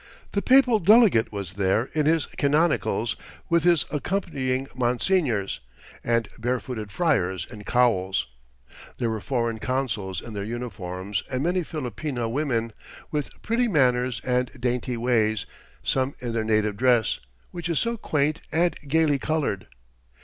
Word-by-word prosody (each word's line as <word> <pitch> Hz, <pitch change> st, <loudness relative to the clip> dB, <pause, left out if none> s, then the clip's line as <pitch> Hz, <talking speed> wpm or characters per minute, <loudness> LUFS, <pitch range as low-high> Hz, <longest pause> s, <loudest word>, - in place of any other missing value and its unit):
The 200 Hz, -, 0 dB
papal 255 Hz, -3 st, +5 dB
delegate 205 Hz, -, +5 dB
was 100 Hz, -4 st, -4 dB
there 100 Hz, +5 st, +1 dB
in 150 Hz, -1 st, +1 dB
his 160 Hz, -1 st, +3 dB
canonicals, 145 Hz, -6 st, +1 dB, 0.3 s
with 170 Hz, -1 st, +3 dB
his 175 Hz, -3 st, +4 dB
accompanying 135 Hz, -6 st, -1 dB
monsignors, 125 Hz, -, +1 dB, 0.4 s
and 115 Hz, -2 st, +1 dB
barefooted 120 Hz, -3 st, -3 dB
friars 95 Hz, -, +1 dB
in 105 Hz, -3 st, -10 dB
cowls. 95 Hz, -, +2 dB, 0.7 s
There 115 Hz, -2 st, 0 dB
were 110 Hz, -2 st, -3 dB
foreign 115 Hz, -3 st, -1 dB
consuls 110 Hz, -8 st, -2 dB
in 115 Hz, -, -9 dB
their 100 Hz, -1 st, -3 dB
uniforms, 100 Hz, -4 st, -4 dB
and 130 Hz, +1 st, -1 dB
many 180 Hz, +2 st, +1 dB
Filipina 135 Hz, -, -4 dB
women, 115 Hz, -5 st, -1 dB, 0.4 s
with 150 Hz, -2 st, -1 dB
pretty 235 Hz, +3 st, +1 dB
manners 125 Hz, -, +2 dB
and 125 Hz, 0 st, +1 dB
dainty 125 Hz, 0 st, -1 dB
ways, 110 Hz, -3 st, +1 dB, 0.4 s
some 135 Hz, +1 st, 0 dB
in 120 Hz, -2 st, -4 dB
their 115 Hz, -1 st, 0 dB
native 110 Hz, -2 st, +1 dB
dress, 120 Hz, -2 st, +3 dB, 0.3 s
which 175 Hz, -1 st, -5 dB
is 165 Hz, -, 0 dB
so 235 Hz, 0 st, +1 dB
quaint 155 Hz, -7 st, 0 dB
and 170 Hz, +2 st, +2 dB
gaily 150 Hz, -1 st, +3 dB
coloured. 150 Hz, -11 st, -1 dB
125 Hz, 135 wpm, -25 LUFS, 110-155 Hz, 0.7 s, papal